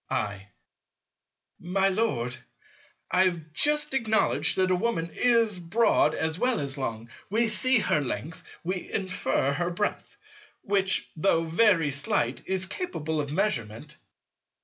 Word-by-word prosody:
I. 100 -1 -3 1.1
My 190 +3 +1
Lord, 185 - -1 0.8
I 185 +1 +4
have 165 -4 -3
just 300 - +2
acknowledged 220 - +2
that 185 0 +2
a - - +4
Woman 180 -4 -1
is 230 -5 +2
broad 175 -2 +2
as 160 +2 -2
well 250 -3 +2
as 140 -1 -3
long. 115 -4 -5 0.2
We 225 +3 +2
see 250 +5 +2
her 155 -8 +1
length, 135 +5 -5 0.2
we 185 +1 -4
infer 185 -8 0
her 175 +4 -1
breadth; 195 +4 -3 0.5
which, 195 -1 +1
though 165 0 +2
very 165 -2 +3
slight, 140 -3 -1
is 190 0 -1
capable 160 - -3
of 145 -1 -5
measurement. 150 - -2
175 Hz, 130 wpm, -27 LUFS, 150-210 Hz, 1.1 s, I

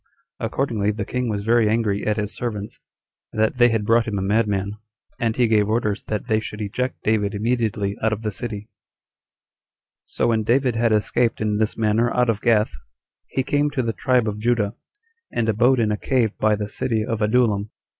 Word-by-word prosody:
Accordingly 115 -3 -1
the 105 - -2
king 125 -1 -2
was 100 -1 -3
very 115 -1 +3
angry 105 -3 0
at 105 0 +1
his 105 -1 -3
servants 105 -4 -5 0.5
that 110 +3 0
they 120 0 +7
had 115 -2 0
brought 115 +1 +3
him 105 -2 -2
a - - -1
madman, 100 -1 0 0.4
and 115 -2 0
he 125 -2 +3
gave 105 -2 +2
orders 110 -2 0
that 105 -1 -3
they 110 -3 +1
should 105 -1 -7
eject 125 +5 -3
David 105 -2 +1
immediately 105 -3 -1
[out 110 - +2
of 110 +1 -3
the 105 - -1
city]. 105 0 -5
3. 105 - -21 1.4
So - - -1
when 110 -1 +2
David 125 +2 +2
had 115 0 +2
escaped 115 +2 +1
in 105 -1 0
this 110 -1 0
manner 115 +2 +2
out 125 -2 +3
of 105 -1 -5
Gath, 110 -7 +2 0.5
he 130 - -1
came 145 +2 +1
to 135 -3 -1
the 115 -1 -1
tribe 125 -2 +1
of 105 0 -3
Judah, 110 -2 +1 0.6
and 115 -1 -1
abode 120 +4 +3
in 110 -2 +2
a 105 - 0
cave 120 -4 0
by 110 0 +3
the 105 0 -4
city 110 +1 -1
of 115 -2 -3
Adullam. 105 -2 +2
110 Hz, 195 wpm, -22 LUFS, 105-120 Hz, 1.4 s, they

